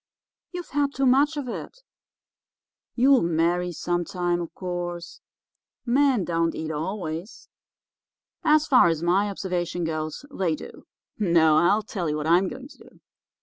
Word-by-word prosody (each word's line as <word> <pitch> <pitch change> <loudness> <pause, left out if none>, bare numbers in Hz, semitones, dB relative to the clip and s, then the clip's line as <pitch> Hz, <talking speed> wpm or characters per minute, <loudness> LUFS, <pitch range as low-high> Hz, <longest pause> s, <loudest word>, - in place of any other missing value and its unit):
You've 355 -3 -7
had 285 0 0
too 270 - +1
much 285 +4 +3
of 280 -3 -4
it. 485 - -7 1.1
You'll 260 +2 +5
marry 170 +2 +1
some 175 +2 -2
time, 175 0 -1
of 170 - -6
course. 175 -1 -5 0.6
Men 260 -4 +2
don't 165 -1 0
eat 160 0 -4
always.' 165 +3 -5 0.9
"'As 305 -1 +4
far 250 - +5
as 165 -1 -1
my 190 +4 +2
observation 180 -3 -3
goes, 155 - -4
they 175 - 0
do. - - -12 0.3
No, 165 -6 +4
I'll 200 +7 +3
tell 185 -6 -3
you 150 - -1
what 150 - -4
I'm 175 +4 +4
going 260 +6 -8
to - - -17
do. - - -18
180 Hz, 145 wpm, -25 LUFS, 170-250 Hz, 1.1 s, You'll